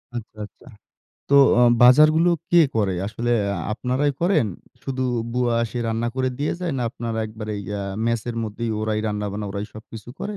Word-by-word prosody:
আচ্ছা, 110 -2 -7
আচ্ছা। 120 - -20 0.6
তো - - +4 0.3
আ - - +5 0.2
বাজারগুলো 155 +7 +6 0.2
কে 175 - +6 0.2
করে? 100 -3 +1
আসলে 120 +3 -3 0.2
আ - - -4 0.2
আপনারাই 130 +5 0
করেন? 170 - +2 0.4
শুধু 130 -1 -3 0.3
বুয়া 125 -1 +1
এসে 120 +2 -5
রান্না 115 +1 -1
করে 130 0 +1
দিয়ে 145 - -1
যায়? 175 -4 -2
না - - -1
আপনারা 115 -3 -5
একবারেই 110 -1 -6
অ্যা 100 -1 -3 0.2
মেসে 115 0 -1
র - - -8
মধ্যেই 110 +2 -4
ওরাই 110 0 -1
রান্না-বান্না 105 0 -3
ওরাই 100 +1 -4
সবকিছু 110 0 -11
করে। 210 0 -4
115 Hz, 175 wpm, -22 LUFS, 110-130 Hz, 0.6 s, বাজারগুলো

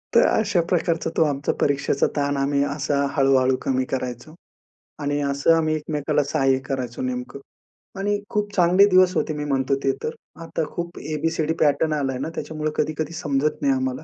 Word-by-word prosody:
तर - - +7
अशा 205 -5 +2
प्रकारचा 170 -2 0
तो 160 - +5
आमचा 145 -2 0
परीक्षेचा 140 -1 +1
ताण 145 -1 0
आम्ही 140 +1 +1
असा 140 0 0
हळू-हळू 130 -1 +4
कमी 130 -1 0
करायचो. 125 +3 -4 0.7
आणि 145 0 -1
असं 140 +3 +3
आम्ही 155 -1 +1
एकमेकांना 150 -1 -1
सहाय्य 135 -2 +2
करायचो 130 -3 -4
नेमकं 125 +2 -4 0.6
आणि 205 +1 0
खूप 205 -1 -1
चांगले 180 +2 +5
दिवस 185 -1 +5
होते 155 - 0
मी 150 0 -4
म्हणतो 135 -1 +1
ते 135 - +3
तर. 460 - -2 0.3
आता 165 0 -2
खूप 170 0 -5
ए-बी-सी-डी 160 +1 -1
पॅटर्न 150 +1 +2
आलाय 135 -4 -1
ना, 135 - -3
त्याच्यामुळे 155 -1 -3
कधी-कधी 155 +2 -1
समजत 145 - 0
नाही 280 - +3
आम्हाला. 260 0 0
145 Hz, 165 wpm, -23 LUFS, 135-165 Hz, 0.7 s, तर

